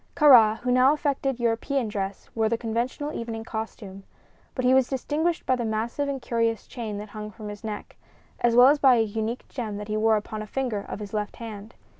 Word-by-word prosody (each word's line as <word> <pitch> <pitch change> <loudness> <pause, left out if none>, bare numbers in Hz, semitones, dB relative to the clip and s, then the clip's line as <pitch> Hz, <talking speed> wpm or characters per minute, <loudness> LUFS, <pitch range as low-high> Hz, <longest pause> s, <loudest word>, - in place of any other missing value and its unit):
Kāra, 235 -8 +7
who 250 - 0
now 255 +3 +5
affected 275 -3 -1
European 235 +2 0
dress, 200 -2 -4
wore 220 -1 +1
the 230 - 0
conventional 240 +6 -3
evening 225 -1 -5
costume; 220 -3 -6 0.5
but 255 - -1
he 255 - +5
was 260 -1 +4
distinguished 305 +5 -1
by 260 - +3
the 245 - -3
massive 230 +6 -2
and 275 -1 -2
curious 230 -2 -1
chain 220 -5 -6
that 210 +1 -7
hung 210 0 -7
from 215 -1 -9
his 205 +1 -9
neck, 215 -2 -6 0.4
as 240 -1 +2
well 250 +2 +8
as 290 +1 +3
by 265 -3 +6
a 225 - +3
unique 220 +2 -3
gem 220 -5 -5
that 210 +1 -7
he 215 - 0
wore 220 0 +3
upon 215 +1 -5
a 215 - -7
finger 245 -2 -2
of - - -5
his 205 -1 -8
left 210 -1 -3
hand. 220 -1 -9
230 Hz, 215 wpm, -26 LUFS, 215-255 Hz, 0.5 s, well